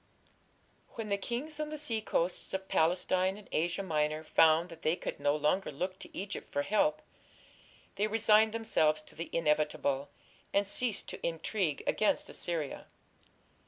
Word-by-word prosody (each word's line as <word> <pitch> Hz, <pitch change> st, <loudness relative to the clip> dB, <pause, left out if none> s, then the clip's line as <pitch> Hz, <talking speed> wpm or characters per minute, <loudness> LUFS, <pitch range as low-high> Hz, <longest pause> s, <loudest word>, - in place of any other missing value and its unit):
When 220 Hz, -2 st, -4 dB
the 200 Hz, -, +2 dB
kings 290 Hz, +9 st, -4 dB
on 305 Hz, 0 st, -2 dB
the 305 Hz, -, -5 dB
seacoasts 220 Hz, -, -1 dB
of 190 Hz, 0 st, -4 dB
Palestine 185 Hz, +3 st, +2 dB
and 210 Hz, -, -13 dB
Asia 170 Hz, +4 st, 0 dB
Minor 155 Hz, -3 st, 0 dB
found 160 Hz, +2 st, +4 dB
that 165 Hz, -, -11 dB
they 160 Hz, -, +2 dB
could 180 Hz, -, -5 dB
no 145 Hz, +1 st, +2 dB
longer 150 Hz, +5 st, +1 dB
look 185 Hz, +6 st, -4 dB
to -, -, -11 dB
Egypt 195 Hz, +1 st, -5 dB
for 145 Hz, -, 0 dB
help, 155 Hz, -5 st, +2 dB, 0.9 s
they 210 Hz, +2 st, +2 dB
resigned 220 Hz, 0 st, +4 dB
themselves 155 Hz, -9 st, +1 dB
to -, -, -17 dB
the 165 Hz, -, -5 dB
inevitable, 150 Hz, -3 st, +1 dB, 0.5 s
and 200 Hz, +1 st, +4 dB
ceased 225 Hz, +2 st, -1 dB
to -, -, -8 dB
intrigue 170 Hz, -1 st, -1 dB
against 215 Hz, -, +1 dB
Assyria. 160 Hz, -5 st, -3 dB
180 Hz, 150 wpm, -32 LUFS, 155-210 Hz, 0.9 s, found